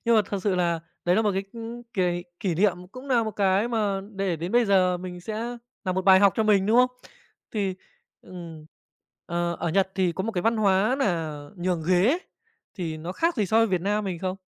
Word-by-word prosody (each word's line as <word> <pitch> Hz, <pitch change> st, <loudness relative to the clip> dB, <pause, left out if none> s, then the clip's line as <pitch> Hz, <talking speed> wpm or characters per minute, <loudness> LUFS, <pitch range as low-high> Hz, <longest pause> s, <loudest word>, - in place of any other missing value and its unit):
Nhưng 230 Hz, 0 st, +4 dB
mà 215 Hz, -, +5 dB
thật 200 Hz, -, -3 dB
sự 200 Hz, -3 st, +1 dB
là 170 Hz, -2 st, 0 dB, 0.2 s
đấy 175 Hz, +1 st, +3 dB
là 220 Hz, -, +3 dB
một 210 Hz, -, +2 dB
cái, 195 Hz, +1 st, -2 dB
ưm, 235 Hz, +1 st, -7 dB
cái 175 Hz, -2 st, 0 dB, 0.2 s
kỷ 180 Hz, -4 st, 0 dB
niệm, 195 Hz, +1 st, +2 dB, 0.2 s
cũng 260 Hz, +2 st, -10 dB
nà 240 Hz, -3 st, +3 dB
một 220 Hz, -, -2 dB
cái 200 Hz, +2 st, +1 dB
mà 210 Hz, -4 st, 0 dB
để 195 Hz, -3 st, -1 dB
đến 170 Hz, +6 st, -5 dB
bây 240 Hz, 0 st, +4 dB
giờ 185 Hz, -3 st, +3 dB
mình 180 Hz, 0 st, -7 dB
sẽ 225 Hz, +5 st, -4 dB, 0.3 s
nà 185 Hz, -, 0 dB
một 190 Hz, +1 st, -1 dB
bài 190 Hz, 0 st, +7 dB
học 200 Hz, -2 st, +6 dB
cho 220 Hz, -, +3 dB
mình, 205 Hz, -2 st, +3 dB
đúng 225 Hz, +3 st, +3 dB
không? 250 Hz, 0 st, +5 dB, 0.6 s
Thì, 195 Hz, -4 st, -1 dB, 0.5 s
ừm, 165 Hz, -4 st, -10 dB, 0.6 s
ờ, 170 Hz, 0 st, -1 dB
ở -, -, 0 dB
Nhật 190 Hz, +3 st, +1 dB
thì 185 Hz, -2 st, +1 dB
có 190 Hz, -, -3 dB
một 225 Hz, -, -2 dB
cái 180 Hz, -4 st, -1 dB
văn 225 Hz, +1 st, +2 dB
hóa 210 Hz, +4 st, +3 dB
nà 165 Hz, -, -1 dB, 0.2 s
nhường 175 Hz, -2 st, -1 dB
ghế. 195 Hz, -, +4 dB, 0.6 s
Thì 165 Hz, -4 st, -4 dB
nó 170 Hz, +4 st, -6 dB
khác 330 Hz, -, 0 dB
gì 210 Hz, -3 st, +1 dB
so 220 Hz, -, +1 dB
với 225 Hz, -, +5 dB
Việt 185 Hz, -4 st, 0 dB
Nam 205 Hz, +2 st, 0 dB
mình 180 Hz, -3 st, -3 dB
không? 185 Hz, +1 st, -3 dB
195 Hz, 230 wpm, -25 LUFS, 180-220 Hz, 0.6 s, bài